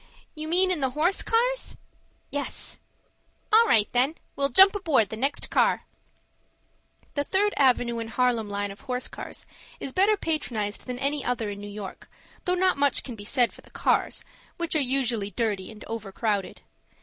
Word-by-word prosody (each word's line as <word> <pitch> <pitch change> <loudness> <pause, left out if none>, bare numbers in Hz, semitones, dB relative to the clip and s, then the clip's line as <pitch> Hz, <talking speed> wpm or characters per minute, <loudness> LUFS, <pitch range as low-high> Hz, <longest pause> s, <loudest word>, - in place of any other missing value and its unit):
"You 310 -1 -6
mean 370 +3 +3
in 355 - +1
the 265 -2 +1
horse 345 +5 +3
cars?" - - 0 0.5
"Yes." 285 0 -4 0.7
"All 455 +1 +7
right 215 - +5
then. 260 +6 +2 0.2
We'll 275 0 +1
jump 385 +6 +7
aboard 315 - +2
the - - -5
next 275 +6 -2
car." - - +2 1.3
The 285 - 0
Third 405 +6 +1
Avenue 245 -3 +3
and 225 0 -5
Harlem 235 -3 +1
line 205 0 -2
of 195 - -12
horse 250 -1 -3
cars - - -8 0.3
is 265 - -5
better 410 +3 +4
patronized 235 - -2
than 250 -1 -4
any 280 +1 0
other 235 -4 -1
in 200 0 -7
New 205 - -7
York, 205 -2 -8 0.4
though 360 - +2
not 370 -5 +2
much 285 -1 +2
can 245 - -7
be 205 -1 -9
said 245 +1 +2
for - - -14
the - - -20
cars, - - 0 0.3
which 340 -1 -2
are 310 - +3
usually 245 -6 0
dirty 205 -2 -2
and 215 -1 -12
overcrowded. 210 -2 -3
255 Hz, 175 wpm, -26 LUFS, 220-325 Hz, 1.3 s, All